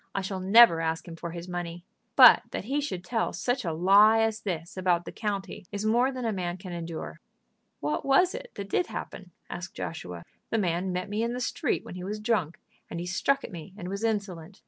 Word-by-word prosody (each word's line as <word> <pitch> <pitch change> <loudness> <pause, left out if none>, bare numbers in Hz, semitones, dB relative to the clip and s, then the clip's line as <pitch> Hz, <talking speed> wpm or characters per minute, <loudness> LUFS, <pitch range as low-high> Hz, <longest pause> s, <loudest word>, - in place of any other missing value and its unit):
I 195 - 0
shall 190 0 -4
never 190 -2 +7
ask 160 +2 -2
him 165 - -7
for 170 +1 -6
his 170 +1 -7
money. 175 -1 -5 0.3
But - - +9
that - - -4
he 275 +7 -1
should 185 -12 -4
tell 225 +5 -1
such 250 +1 -1
a 170 - -1
lie 200 +7 +6
as 225 -1 0
this 170 -4 -4
about 180 -2 +1
the - - -6
county 200 -4 -4
is 205 +1 -3
more 240 +4 +3
than 255 -2 -5
a 225 - 0
man 180 -2 -3
can 185 -1 -8
endure." 165 - -6 0.6
"What 145 +1 -1
was 275 +7 +4
it - - -7
that 200 - -6
did 345 - 0
happen?" 185 - -7 0.2
asked 175 0 -7
Joshua. 90 - -6 0.3
"The 225 - 0
man 180 -2 0
met 180 0 -3
me 210 +2 -2
in 235 +1 -1
the 250 - -3
street 250 - -1
when - - -8
he 180 0 -7
was 210 +3 -4
drunk, 210 -8 0 0.3
and 170 - -5
he 175 - -4
struck 275 +10 +1
at - - -7
me 175 +2 -9
and 180 -3 -6
was 200 +3 -4
insolent. 200 -5 -3
190 Hz, 225 wpm, -28 LUFS, 175-225 Hz, 0.6 s, But